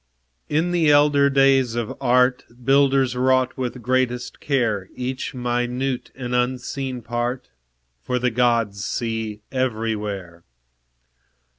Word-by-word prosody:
In 160 +4 +1
the 170 -3 +3
elder 145 -1 +5
days 135 -3 +3
of 120 -2 -3
Art, 125 0 +3 0.2
Builders 135 -2 +3
wrought 130 0 +2
with 125 -1 -4
greatest 125 0 -1
care 115 -9 0
Each 130 +1 -4
minute 125 +1 -2
and 125 -2 -5
unseen 125 +1 -2
part; 120 +2 -3 0.5
For 125 - -2
the 125 0 0
Gods 115 -4 +1
see 110 -2 -3
everywhere. 105 -8 -3
125 Hz, 110 wpm, -22 LUFS, 120-130 Hz, 0.5 s, elder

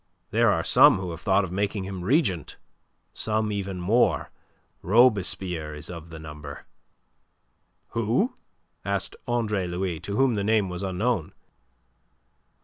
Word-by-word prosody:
There - - +4
are - - +1
some - - +6
who 95 -2 -4
have 85 0 -8
thought 95 0 +3
of 90 - -5
making 100 +1 -1
him 95 -2 -6
regent, 100 - +1 0.6
some 110 0 -1
even 100 -2 -3
more; 110 +8 +2 0.5
Robespierre 95 -7 +2
is 75 - -8
of 85 -1 -9
the 80 - -9
number." 75 -2 -9 1.2
"Who?" 115 - 0 0.5
asked - - -2
Andre 110 -6 0
Louis, 90 -1 -2
to 100 +4 -5
whom 135 +1 +3
the 100 -2 -1
name 105 -2 +2
was 90 +1 -5
unknown. 95 -1 -1
95 Hz, 135 wpm, -26 LUFS, 90-110 Hz, 1.2 s, some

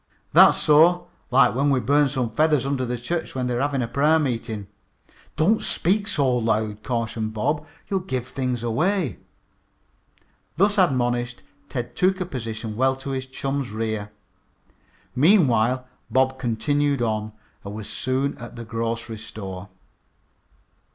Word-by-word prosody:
"That's - - +7
so. 165 +4 +5 0.2
Like 135 +2 +5
when 140 +3 +1
we 135 -2 +3
burned 145 +4 +3
some 125 -4 -2
feathers 150 +1 +2
under 135 -2 -1
the 125 0 -2
church 160 +8 -4
when 130 -1 -1
they 125 - -1
were 120 - -1
having 135 -4 0
prayer 150 +6 +3
meeting." 115 -7 -2 0.7
"Don't 205 +8 +3
speak 200 +4 +1
so 135 - +2
loud," 110 -2 -1
cautioned 115 -2 -3
Bob. 150 +7 -1 0.2
"You'll 195 - 0
give 130 -9 -4
things 130 -3 -3
away." 155 - 0 1.4
Thus 200 +3 +3
admonished, 120 -7 +1 0.3
Ted 120 -3 -5
took 185 +1 +2
a 185 - -1
position 115 -7 -5
well 130 +3 +2
to 135 +1 -6
his 130 -1 -3
chum's 135 0 -3
rear. 110 -1 -3 1.0
Meanwhile 130 - +4 0.2
Bob 130 0 +2
continued 140 +3 0
on 110 -1 -2 0.3
and 100 +1 -7
was 110 -1 -6
soon 130 +2 -1
at 120 0 -9
the 115 0 -7
grocery 115 0 -3
store. 100 -4 -7
130 Hz, 140 wpm, -23 LUFS, 115-145 Hz, 1.4 s, That's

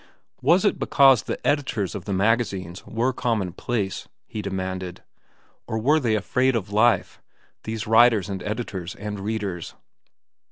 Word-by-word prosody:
Was 180 +4 +4
it - - +2
because 135 -5 +5
the - - -4
editors 130 - 0
of 100 -4 -6
the - - -4
magazines 95 -3 0
were 120 +4 0
commonplace? 105 -2 -2 0.2
he 110 - -6
demanded. 95 -2 -4 0.6
Or 110 - -2
were 145 +8 +3
they 115 -6 +1
afraid 125 +5 +1
of 100 -2 -3
life, 110 -2 +2 0.4
these 110 0 -4
writers 115 -3 +5
and 95 -2 -4
editors 100 -4 -4
and 105 0 -6
readers? 100 -4 -4
105 Hz, 135 wpm, -24 LUFS, 95-120 Hz, 0.6 s, because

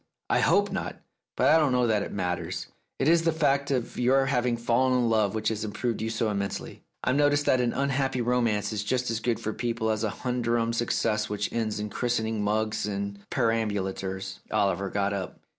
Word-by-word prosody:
"I - - +4
hope - - +3
not. - - -3 0.4
But - - +4
I 160 - +6
don't 145 -5 +2
know 125 -1 +3
that 110 -3 +2
it - - -4
matters. 90 -3 -3 0.3
It 135 - 0
is 165 +1 +5
the 165 0 +2
fact 140 -3 +1
of 125 -4 -2
your 135 +2 +4
having 125 -3 +1
fallen 125 +2 +2
in 120 -2 +2
love 110 -2 +2
which 110 0 0
has 110 -1 -3
improved 110 +2 -2
you 110 - -1
so 115 -1 0
immensely. 100 -1 -4 0.2
I've 130 - +2
noticed 145 0 +3
that 130 - +3
an 120 -1 +1
unhappy 135 -1 0
romance 115 -4 +1
is 105 -1 -2
just 125 +3 0
as 115 - -1
good 115 0 -1
for 110 - -3
people 115 -1 -1
as 110 0 -1
a 110 - +1
humdrum 120 0 -1
success 110 -2 0
which 105 0 -2
ends 110 -3 -1
in 105 0 -4
christening 110 -3 -1
mugs 110 +1 0
and 100 0 -3
perambulators." 100 -5 -1
Oliver 100 0 +1
got 100 +1 0
up. 95 -2 -5
115 Hz, 200 wpm, -27 LUFS, 105-125 Hz, 0.4 s, I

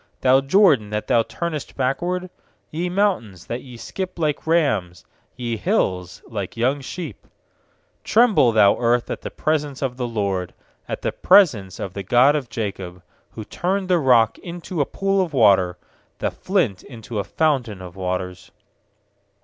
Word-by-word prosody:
Thou 130 +1 +5
Jordan, 140 - +4
that 105 0 -3
thou 115 - +3
turnest 155 +4 -5
backward? 175 +8 -1 0.4
6Ye 175 +3 -2
mountains, 180 - -1
that 120 +2 -4
ye 125 -3 -12
skip 185 +10 -6
like 155 -2 -1
rams, 110 - +1 0.3
Ye 120 -2 -3
hills, 95 - -1
like 105 -3 -5
young 130 +5 +1
sheep? 170 +5 -7 0.8
7Tremble, 220 - +4
thou 105 -2 +5
earth, 120 0 +1
at - - -4
the - - -5
pres 155 -1 0
ence 140 -2 -7
of 125 -2 -2
the 125 -2 -2
Lord, 100 -5 -2 0.3
At - - -4
the - - 0
presence 110 - +3
of 95 - -5
the 100 - -5
God 125 +8 +4
of 135 -5 -3
Jacob; 95 -6 -5 0.3
8Who 110 -1 -6
turned 190 +1 -2
the 180 -2 +4
rock 125 -6 +3
into 175 -1 -5
a 140 - 0
pool 195 0 0
of 175 -5 -3
water, 95 -7 +4 0.4
The - - -1
flint 160 - -1
into 115 -3 -7
a - - -1
fountain 130 -11 0
of 90 -1 -10
waters. 90 -1 -4
125 Hz, 160 wpm, -22 LUFS, 100-165 Hz, 0.8 s, Thou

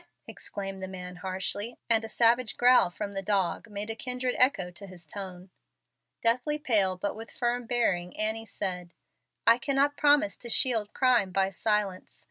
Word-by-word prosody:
exclaimed 195 -1 -6
the 190 - -4
man, 180 -1 -8
harshly, 190 +5 -2
and 225 -1 +3
a 225 - -6
savage 235 +1 +2
growl 245 -6 +5
from 200 +3 -6
the 195 - -3
dog 195 +2 -1
made 205 0 -5
a 225 - -4
kindred 250 +2 -3
echo 220 -9 +3
to 195 +3 -10
his 180 -3 -10
tone. 185 +1 -7 0.7
Deathly 250 +6 +2
pale, 210 -11 +2
but 200 +2 -3
with 225 +1 -9
firm 240 0 -2
bearing, 180 -8 0
Annie 220 +1 -1
said, 180 -4 -4 0.5
"I 230 +2 +6
cannot 280 +2 +1
promise 295 +1 +3
to 235 - -6
shield 225 -4 +3
crime 245 -7 +3
by 195 +1 +1
silence. 205 -1 -1
210 Hz, 165 wpm, -28 LUFS, 190-245 Hz, 0.7 s, I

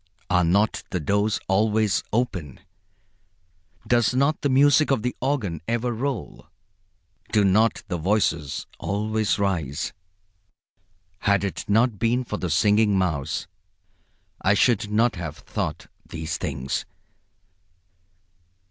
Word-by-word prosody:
Are 90 0 +4
not 100 +6 +2
the 90 - -2
doors 100 +7 +1
always 105 +1 +2
open? 95 - -2 1.3
Does 120 0 +2
not 140 +4 +2
the 145 - +1
music 145 +3 +4
of 135 -6 +1
the 125 - -2
organ 120 - -1
ever 120 +1 0
roll, 125 - -4 0.8
do 105 -2 +3
not 110 +4 +3
the 90 -3 -3
voices 85 -5 0
always 110 +1 0
rise? 85 -9 -1 1.3
Had 100 0 +2
it 100 - -3
not 110 0 +2
been 120 +2 +1
for 105 -3 -4
the 90 - -3
Singing 105 +5 +3
Mouse 80 -6 -1 1.0
I 100 +2 +3
should 110 -1 +2
not 110 0 +2
have 80 -4 -5
thought - - -4 0.2
these 80 -1 -4
things. 65 +2 -3
105 Hz, 115 wpm, -24 LUFS, 90-120 Hz, 1.3 s, Are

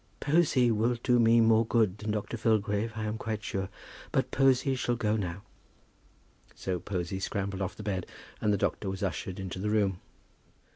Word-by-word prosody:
"Posy 145 -6 +3
will 115 +3 +2
do 125 -1 +4
me 115 0 +6
more 115 0 +5
good 110 -4 +1
than 110 - -4
Dr. 105 +2 -2
Filgrave 110 -1 +1
I 110 - -3
am 105 +1 -3
quite 110 -2 -3
sure; 95 0 -3 0.4
but - - 0
Posy 135 0 +3
shall 125 -1 0
go 110 -2 0
now." 95 -2 -3 1.1
So 90 -2 -3
Posy 90 0 -3
scrambled 100 0 -3
off 95 - -2
the 105 - -8
bed, 95 -3 -2 0.3
and 105 - +2
the 100 - +2
doctor 95 +1 -1
was 95 +2 -4
ushered 95 -1 -3
into 95 -1 -5
the 105 +2 -1
room. 100 -4 +1
105 Hz, 180 wpm, -29 LUFS, 95-115 Hz, 1.1 s, me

